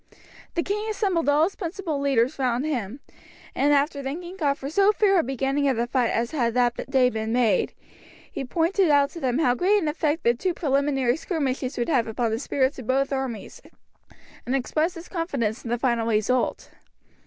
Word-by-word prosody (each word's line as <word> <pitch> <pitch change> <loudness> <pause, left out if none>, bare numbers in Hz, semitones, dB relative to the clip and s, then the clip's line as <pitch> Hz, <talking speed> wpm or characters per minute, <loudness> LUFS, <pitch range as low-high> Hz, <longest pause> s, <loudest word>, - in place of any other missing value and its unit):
The 340 - +1
king 420 +2 -2
assembled 380 -8 0
all 295 +2 +4
his 375 +4 0
principal 340 -5 -4
leaders 275 -1 +1
round 250 +1 0
him, 255 -4 -3 0.5
and 285 +2 +2
after 285 0 +2
thanking 345 +7 -6
God 290 -7 +1
for 275 - -7
so 395 +7 +4
fair 400 -3 +3
a - - +2
beginning 270 +2 0
of 260 - 0
the 235 - +1
fight 245 -1 +1
as 235 +1 -1
had 240 -6 0
that 245 0 0
day 260 -2 +3
been 220 0 -3
made, 240 -2 +1 0.6
he - - -4
pointed 335 +7 +1
out 285 -1 +4
to 335 - -8
them 255 -4 0
how 255 -6 +3
great 375 +11 +2
an 320 - -2
effect 300 +1 -1
the 235 - +4
two 355 +8 -2
preliminary 275 -4 +1
skirmishes 275 -7 -2
would 240 - -1
have 255 -8 +2
upon 225 +1 -1
the 220 - -1
spirits 265 0 0
of 240 - -9
both 275 +2 +1
armies, 260 -6 -4 0.8
and 255 - -1
expressed 310 +7 0
his 335 +1 -9
confidence 275 - -2
in 230 - -6
the 240 - 0
final 235 -2 0
result. 230 +3 0
275 Hz, 195 wpm, -25 LUFS, 245-325 Hz, 0.8 s, all